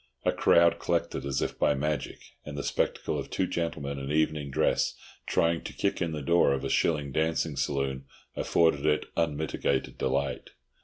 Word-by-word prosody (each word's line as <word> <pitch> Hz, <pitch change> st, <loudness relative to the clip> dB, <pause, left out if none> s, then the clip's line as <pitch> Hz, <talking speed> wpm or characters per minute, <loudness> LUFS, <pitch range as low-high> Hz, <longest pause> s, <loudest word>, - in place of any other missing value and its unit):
A -, -, +4 dB
crowd 85 Hz, 0 st, +4 dB
collected 70 Hz, -, -1 dB
as 70 Hz, -1 st, 0 dB
if -, -, -4 dB
by 75 Hz, -, +3 dB
magic, 75 Hz, 0 st, -2 dB, 0.3 s
and 75 Hz, -1 st, -7 dB
the 70 Hz, -, -3 dB
spectacle -, -, -1 dB
of -, -, -6 dB
two 95 Hz, -, 0 dB
gentlemen 75 Hz, -5 st, -3 dB
in 70 Hz, +1 st, -4 dB
evening 75 Hz, -2 st, +1 dB
dress 65 Hz, -, +1 dB, 0.3 s
trying 85 Hz, 0 st, +2 dB
to -, -, -6 dB
kick -, -, -1 dB
in 85 Hz, -, 0 dB
the 75 Hz, -2 st, -4 dB
door 85 Hz, -1 st, +4 dB
of 70 Hz, 0 st, -2 dB
a 70 Hz, -, -2 dB
shilling 75 Hz, -1 st, +1 dB
dancing 80 Hz, +1 st, 0 dB
saloon 65 Hz, -1 st, -1 dB, 0.3 s
afforded 80 Hz, -4 st, +2 dB
it 75 Hz, 0 st, +2 dB
unmitigated 80 Hz, -2 st, -1 dB
delight. 70 Hz, +1 st, -1 dB
75 Hz, 170 wpm, -28 LUFS, 70-80 Hz, 0.3 s, A